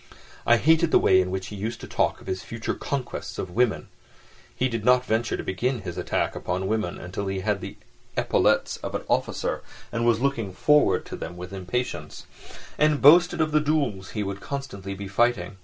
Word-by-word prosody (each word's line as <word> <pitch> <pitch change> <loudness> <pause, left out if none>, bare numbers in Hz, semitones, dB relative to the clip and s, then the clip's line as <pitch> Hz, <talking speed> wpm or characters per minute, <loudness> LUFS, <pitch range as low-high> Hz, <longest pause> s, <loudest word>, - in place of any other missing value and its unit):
I 120 - +6
hated 160 +5 +4
the - - +5
way 95 0 +5
in 90 - -2
which 95 0 -4
he 105 - -7
used 110 +4 -4
to - - -7
talk - - 0
of - - -15
his 95 0 -3
future 115 -1 -4
conquests 135 -3 -4
of 90 - -4
women 120 +2 +1 0.7
(he 130 - +1
did 115 -4 -3
not 125 +1 +4
venture 115 0 0
to - - -5
begin 120 +6 -1
his 85 -3 -6
attack - - -1
upon 90 +2 -2
women 105 -3 -1
until 95 +3 -5
he 95 0 -2
had 100 0 0
the - - -7 0.4
epaulettes - - +2
of - - -6
an - - -3
officer, - - -1 0.3
and 115 - -1
was 120 -1 +3
looking 115 -7 -1
forward 150 +10 +3
to - - -7
them 85 +2 -7
with 90 +2 -8
impatience), 90 -4 -4 0.5
and 150 -1 +3
boasted 175 +4 +6
of 155 0 +1
the 155 0 +3
duels 140 -11 0
he 105 - 0
would 100 0 -5
constantly 125 -9 -5
be 100 0 -6
fighting. 100 -2 +1
110 Hz, 200 wpm, -25 LUFS, 95-130 Hz, 0.7 s, I